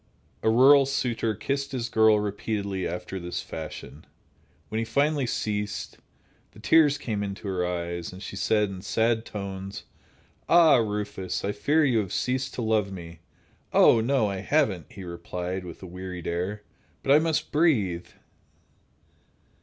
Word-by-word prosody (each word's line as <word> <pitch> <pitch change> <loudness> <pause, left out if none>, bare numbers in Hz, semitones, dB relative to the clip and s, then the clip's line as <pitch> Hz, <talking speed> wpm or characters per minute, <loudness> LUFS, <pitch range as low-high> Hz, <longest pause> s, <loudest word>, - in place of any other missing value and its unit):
A - - +2
rural 135 +4 +6
suitor 120 -5 -1
kissed 140 +6 -3
his 120 -3 -2
girl 110 -2 +4
repeatedly 100 -2 -2
after 90 +2 -5
this 90 0 -4
fashion. 80 -1 -8 0.7
When 110 - -2
he - - 0
finally 140 +4 +1
ceased, 105 -2 -3 0.5
the - - -15
tears 145 +4 +4
came 110 -7 -3
into 100 +1 -5
her 95 -2 -1
eyes, 85 -1 -3
and 90 - -10
she 100 0 -7
said, 105 0 +1
in 95 -1 -7
sad 110 +2 +1
tones: 100 -1 -6 0.7
"Ah, 165 -5 +7
Rufus! 105 -5 -2
I 100 - 0
fear 150 +8 +2
you 125 -5 +3
have 100 -4 -3
ceased 130 +1 -1
to 120 - -3
love 110 -3 +1
me!" 85 -3 -9 0.5
"Oh, 115 - +6
no, 125 -1 +2
I 100 -1 -3
haven't," 100 - 0
he 95 - -9
replied, 90 +1 -5
with 85 +2 -10
a - - -6
wearied 90 -1 -7
air, 95 +5 -3 0.4
"but 135 - +1
I 145 - +8
must 160 -1 -1
breathe!" 110 - +2
105 Hz, 155 wpm, -26 LUFS, 95-125 Hz, 0.7 s, I